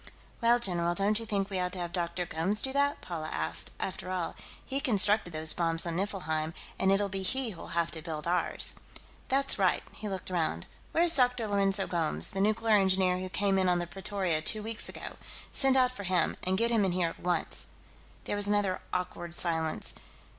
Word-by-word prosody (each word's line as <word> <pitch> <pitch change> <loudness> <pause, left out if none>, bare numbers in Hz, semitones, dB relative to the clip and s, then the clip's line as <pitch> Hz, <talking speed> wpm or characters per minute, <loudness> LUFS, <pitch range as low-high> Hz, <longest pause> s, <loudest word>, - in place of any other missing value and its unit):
"Well, 235 +1 +5
general, 175 -6 0
don't 205 +3 +2
you 225 - -7
think 200 -2 -1
we 190 - -2
ought 180 0 -2
to - - -2
have 175 0 -4
Dr. 175 0 -2
Gomes 180 +6 +1
do 265 - -1
that?" 285 +1 +1
Paula 160 -3 -5
asked. 80 +1 +1
"After 185 -1 -4
all, 185 -2 -2 0.3
he 270 +1 -2
constructed 210 -6 +3
those 155 0 +6
bombs 165 -1 0
on 170 -1 -3
Niflheim, 165 -5 -2 0.2
and 190 - +3
it'll 200 +1 +2
be 195 0 -4
he 250 +5 0
who'll 170 -2 -8
have 170 -1 +1
to 160 - -3
build 155 -2 -6
ours." 175 +1 0 0.5
"That's 275 -3 +2
right." 185 -2 +2
He 210 - -6
looked 190 -1 -4
around. 160 - -1 0.3
"Where's 340 0 +5
Dr. 250 -3 +3
Lourenço 195 -1 +1
Gomes, 165 -3 -1
the 195 - -2
nuclear 215 +1 +3
engineer 185 -2 +3
who 185 0 -5
came 195 +1 +1
in 185 -1 +2
on 180 - +3
the 175 - -2
Pretoria, 190 -3 -1
two 215 +6 +1
weeks 225 0 -1
ago? - - -8 0.3
Send 270 -1 +4
out 255 -1 +3
for 255 - -8
him, 180 -3 +1
and 185 +1 0
get 230 +2 +1
him 225 -3 +3
in 190 -2 0
here 175 -2 +1
at - - -12
once." 175 -1 -1 0.6
There - - -3
was 205 0 +3
another 205 -2 0
awkward 175 -1 -4
silence. 160 -3 0
190 Hz, 205 wpm, -29 LUFS, 170-210 Hz, 0.6 s, those